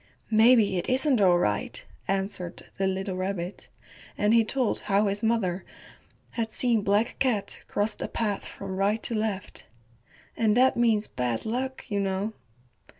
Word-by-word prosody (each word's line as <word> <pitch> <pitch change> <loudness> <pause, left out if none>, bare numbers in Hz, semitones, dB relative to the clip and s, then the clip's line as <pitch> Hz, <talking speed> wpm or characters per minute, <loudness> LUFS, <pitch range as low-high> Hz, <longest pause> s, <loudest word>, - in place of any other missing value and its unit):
"Maybe 220 -3 +5
it - - -4
isn't 260 -2 +2
all 180 -3 +5
right," 105 -11 -1 0.2
answered 195 -2 -3 0.2
the 195 - +2
little 190 0 -2
rabbit, 185 -1 -4 0.5
and 210 +2 +3
he 230 -1 +6
told 250 +1 -1
how 200 +1 +3
his 200 +1 -1
mother 210 -6 0 0.7
had 230 -1 -2
seen 235 -1 +3
Black 205 +4 +1
Cat 235 -7 0
cross 205 +2 0
the - - -5
path 210 -3 -2
from 190 -1 -7
right 205 +3 +1
to - - +1
left. 215 -3 -3 0.7
"And 220 -1 +2
that 260 +1 +5
means 225 -3 +2
bad 125 -2 -3
luck, 260 +4 -3
you 205 -3 -1
know." 195 +2 -1
205 Hz, 150 wpm, -27 LUFS, 190-230 Hz, 0.7 s, he